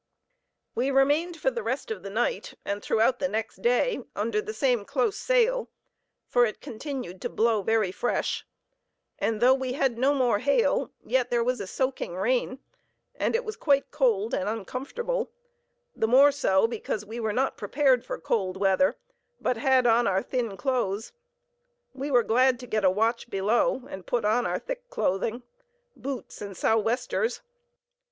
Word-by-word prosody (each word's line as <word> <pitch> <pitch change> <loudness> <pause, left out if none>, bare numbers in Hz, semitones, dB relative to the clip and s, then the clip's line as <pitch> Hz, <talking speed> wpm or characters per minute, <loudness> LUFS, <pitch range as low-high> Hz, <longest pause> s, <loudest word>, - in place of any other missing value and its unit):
We 255 +3 0
remained 290 +6 +2
for 265 - +1
the 235 - -4
rest 235 +3 -3
of 210 -4 -4
the 195 - -7
night, 240 - -2
and 200 +1 -2
throughout 230 +5 +2
the 275 - +1
next 220 -5 -4
day, 245 - +2
under 210 +1 0
the 215 - -5
same 240 0 +1
close 280 - 0
sail, - - +1 0.6
for 245 - +4
it 220 -3 -1
continued 240 - -6
to - - -2
blow 225 -1 +2
very 220 -2 +1
fresh; 240 - -1 0.8
and 225 -1 0
though 255 +2 +7
we 260 -1 -2
had 260 -3 0
no 275 +3 +3
more 245 -6 +2
hail, 280 - +2 0.2
yet 255 -2 +1
there 240 -1 +2
was 250 -1 -1
a 195 - -5
soaking 260 -5 -2
rain, 250 +5 0 0.6
and - - -1
it 485 +1 0
was 435 -1 -4
quite 280 -2 +1
cold 230 -7 +1
and 185 - 0
uncomfortable; 275 - -3 0.7
the 220 - +1
more 270 +5 +7
so, 190 -8 +2
because 220 -2 -4
we 225 +3 -7
were 220 -2 -1
not 260 +5 0
prepared 255 +3 +2
for - - -5
cold 190 -4 -1
weather, 195 +8 +2 0.4
but 250 - 0
had 260 +1 +3
on 235 0 +4
our 190 0 +1
thin 240 -6 -2
clothes. 230 - -1 0.8
We 275 +2 -4
were 245 -4 +4
glad 250 +2 +3
to - - -7
get 215 -3 -1
a 190 - +6
watch 225 +5 0
below, 220 +6 +1
and 190 - -8
put 235 -3 0
on 230 +4 +2
our - - -1
thick - - -7
clothing, 230 - -1 0.5
boots, 265 -5 -6
and 200 -2 -6
southwesters. 225 - 0
240 Hz, 170 wpm, -27 LUFS, 215-270 Hz, 0.8 s, though